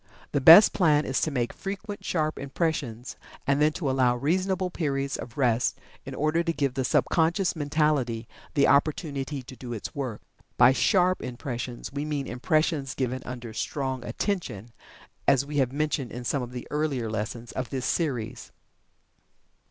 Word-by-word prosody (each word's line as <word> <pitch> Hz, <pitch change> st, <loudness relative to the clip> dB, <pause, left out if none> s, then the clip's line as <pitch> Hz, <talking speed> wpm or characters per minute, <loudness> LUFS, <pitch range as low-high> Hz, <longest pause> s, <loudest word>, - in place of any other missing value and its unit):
The 145 Hz, -, 0 dB
best 165 Hz, +9 st, +10 dB
plan 155 Hz, -5 st, +3 dB
is 135 Hz, -, 0 dB
to -, -, +1 dB
make 125 Hz, -5 st, -1 dB
frequent, 200 Hz, +1 st, -6 dB
sharp 155 Hz, -3 st, -1 dB
impressions, 135 Hz, -5 st, -3 dB, 0.3 s
and 140 Hz, +1 st, +2 dB
then 150 Hz, +1 st, +5 dB
to 160 Hz, -4 st, -3 dB
allow 130 Hz, -2 st, +3 dB
reasonable 185 Hz, +7 st, 0 dB
periods 140 Hz, -5 st, -1 dB
of 120 Hz, -, -8 dB
rest 125 Hz, -3 st, +2 dB, 0.3 s
in -, -, -5 dB
order 155 Hz, +3 st, +1 dB
to 170 Hz, -, 0 dB
give 140 Hz, -4 st, -1 dB
the 130 Hz, 0 st, -1 dB
sub -, -, +2 dB
conscious 175 Hz, +3 st, +2 dB
mentality 145 Hz, -6 st, 0 dB, 0.3 s
the 140 Hz, -2 st, +4 dB
opportunity 140 Hz, -2 st, +1 dB
to 130 Hz, +1 st, -11 dB
do 120 Hz, -1 st, -7 dB
its 110 Hz, -, -6 dB
work. 130 Hz, -8 st, -4 dB, 0.4 s
By 125 Hz, +1 st, +7 dB
"sharp" 185 Hz, +4 st, +3 dB
impressions 120 Hz, 0 st, -5 dB
we 140 Hz, +1 st, -2 dB
mean 150 Hz, -2 st, -2 dB
impressions 145 Hz, +2 st, 0 dB
given 130 Hz, -1 st, -2 dB
under 120 Hz, -2 st, -6 dB
strong 130 Hz, +1 st, -3 dB
attention, 120 Hz, -, -3 dB, 0.6 s
as 135 Hz, 0 st, +4 dB
we 145 Hz, +1 st, -4 dB
have 130 Hz, -3 st, +2 dB
mentioned 145 Hz, -3 st, -1 dB
in 125 Hz, +1 st, -6 dB
some 135 Hz, +3 st, 0 dB
of 125 Hz, 0 st, -6 dB
the 125 Hz, -1 st, -7 dB
earlier 150 Hz, -6 st, -1 dB
lessons 110 Hz, +2 st, -4 dB
of 130 Hz, -2 st, -4 dB
this 130 Hz, -2 st, -3 dB
series. 125 Hz, -7 st, -2 dB
140 Hz, 165 wpm, -27 LUFS, 125-155 Hz, 0.6 s, best